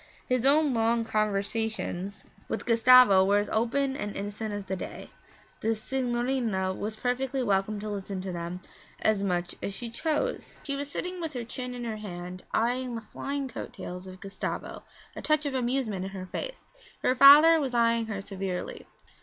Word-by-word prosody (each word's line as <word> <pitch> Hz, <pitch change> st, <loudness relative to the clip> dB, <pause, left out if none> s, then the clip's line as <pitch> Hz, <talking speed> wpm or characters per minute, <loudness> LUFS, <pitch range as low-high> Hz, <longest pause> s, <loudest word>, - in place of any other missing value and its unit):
His 255 Hz, 0 st, +2 dB
own 295 Hz, 0 st, +4 dB
long 230 Hz, 0 st, +2 dB
conversations 210 Hz, -2 st, -2 dB, 0.2 s
with -, -, -3 dB
Gustavo 230 Hz, -4 st, +7 dB
were 200 Hz, +2 st, +3 dB
as 205 Hz, -, 0 dB
open 265 Hz, +5 st, +1 dB
and 210 Hz, -5 st, -4 dB
innocent 205 Hz, +2 st, -4 dB
as 205 Hz, -1 st, -4 dB
the 190 Hz, -, -2 dB
day; -, -, -7 dB, 0.5 s
the 225 Hz, +1 st, +1 dB
signorina 240 Hz, -5 st, -1 dB
was 215 Hz, +3 st, -4 dB
perfectly 255 Hz, +3 st, -1 dB
welcome 205 Hz, -1 st, +1 dB
to 215 Hz, -, -5 dB
listen 195 Hz, -1 st, -4 dB
to 190 Hz, 0 st, -4 dB
them 175 Hz, +1 st, -5 dB, 0.4 s
as 215 Hz, -2 st, +3 dB
much 180 Hz, -3 st, -1 dB
as 195 Hz, -, -3 dB
she 235 Hz, +1 st, -5 dB
chose. 320 Hz, -, -2 dB
She 280 Hz, -, -2 dB
was 285 Hz, +1 st, -4 dB
sitting 360 Hz, +4 st, -4 dB
with 320 Hz, -2 st, -4 dB
her 245 Hz, -2 st, -3 dB
chin 250 Hz, +2 st, -6 dB
in 245 Hz, -, -5 dB
her 225 Hz, -2 st, -3 dB
hand, 180 Hz, -3 st, -7 dB
eyeing 245 Hz, +2 st, 0 dB
the 230 Hz, -, -4 dB
flying 275 Hz, +5 st, -4 dB
coat 250 Hz, -, -7 dB
tails 180 Hz, +1 st, -7 dB
of 185 Hz, 0 st, -10 dB
Gustavo, 195 Hz, 0 st, -5 dB, 0.3 s
a -, -, -6 dB
touch 305 Hz, -1 st, +1 dB
of 285 Hz, -, -2 dB
amusement 245 Hz, -6 st, -1 dB
in -, -, -4 dB
her 185 Hz, -1 st, -6 dB
face. -, -, -7 dB, 0.3 s
Her -, -, +4 dB
father 295 Hz, +5 st, +9 dB
was 265 Hz, -4 st, -2 dB
eyeing 230 Hz, -1 st, +3 dB
her 200 Hz, -3 st, -4 dB
severely. 195 Hz, -2 st, -5 dB
225 Hz, 180 wpm, -28 LUFS, 195-260 Hz, 0.5 s, father